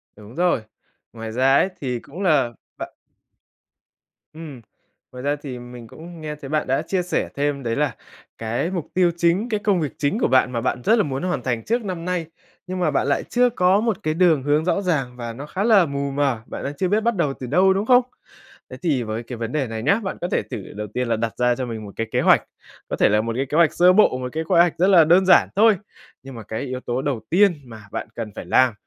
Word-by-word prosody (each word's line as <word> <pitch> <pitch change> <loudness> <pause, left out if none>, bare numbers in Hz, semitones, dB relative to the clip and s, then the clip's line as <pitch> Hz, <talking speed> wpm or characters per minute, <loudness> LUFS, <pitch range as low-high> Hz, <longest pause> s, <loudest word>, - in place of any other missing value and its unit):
Đúng 105 +2 -14
rồi. 175 -8 +1 0.5
Ngoài 115 -1 -7
ra 130 +4 +3
ấy 185 - +3
thì 125 -3 -2
cũng 160 +10 -10
là 150 -10 +2 0.3
bạn - - -7 1.4
Ừm. 155 -6 -9 0.5
Ngoài 125 0 -9
ra 145 +1 +1
thì 140 -4 -8
mình 120 -1 -11
cũng 165 +5 -12
nghe 150 -1 -5
thấy 140 -2 -10
bạn 155 +1 -1
đã 135 +3 +1
chia 180 +3 -1
sẻ 180 - -2
thêm 140 -1 -1
đấy 115 -1 -1
là 145 -4 0 0.4
cái 115 +10 -2
mục 175 -5 -4
tiêu 180 -1 +3
chính, 175 +7 +1
cái 215 -2 0
công 205 -3 +1
việc 150 - -3
chính 145 +9 0
của - - +2
bạn 130 -1 +3
mà 120 -2 -2
bạn 125 0 -2
rất 225 - +4
là 215 - +3
muốn 135 0 -4
hoàn 175 -8 -1
thành 120 -3 -2
trước 235 +1 0
năm 180 -4 -5
nay, 180 -2 -2 0.4
nhưng 185 0 -4
mà 175 -4 +1
bạn 140 - 0
lại 140 - +1
chưa 245 0 +2
có 190 -3 +3
một 225 -4 0
cái 155 - 0
đường 165 -5 +3
hướng 150 +3 +1
rõ 185 +2 +1
ràng 145 -10 -1
và 120 -1 -5
nó 135 +5 -8
khá 185 +6 -3
là 210 -5 +5
mù 140 -1 -3
mờ, 135 -5 0
bạn - - -7
đang 140 - -3
chưa 185 - 0
biết 210 +4 +1
bắt 235 +1 0
đầu 150 -7 0
từ 130 - -6
đâu, 185 +8 +4
đúng 195 +2 -1
không? 250 +1 +6 0.7
Thế - - -7
thì 150 -9 0
với 110 +1 -4
cái 120 +1 -8
vấn 115 0 -4
đề 140 -3 -1
này 110 -1 -5
nhá, 200 - +3
bạn 195 - -4
có 175 - -1
thể - - +1
thử - - -7 0.2
đầu 105 +1 -5
tiên 125 0 -1
là 115 - +1
đặt 115 0 -3
ra 125 0 +2
cho 130 +1 -3
mình 110 -3 -6
một 100 - -9
cái 115 - -3
kế - - +1
hoạch, - - +4 0.5
có - - -2
thể - - +3
là 105 +1 +3
một 115 +1 -3
cái 135 - 0
kế 150 +3 -2
hoạch 170 -3 +4
sơ 180 +1 +5
bộ, 200 -10 +4
một 125 0 -4
cái 160 +1 -2
khóe 160 - +2
hoạch 175 -2 +3
rất 180 - +3
là 180 -5 +6
đơn 180 +4 +4
giản 185 - +5
thôi. 215 0 +5 0.5
Nhưng 135 -1 -10
mà 115 - -8
cái 110 +2 -5
yếu 130 -2 -4
tố 125 0 -3
đầu 135 -4 -2
tiên 200 +4 +5
mà 110 -3 -12
bạn - - -4
cần 115 -2 -5
phải - - -7
làm, 130 -2 +3
145 Hz, 260 wpm, -22 LUFS, 125-180 Hz, 1.4 s, không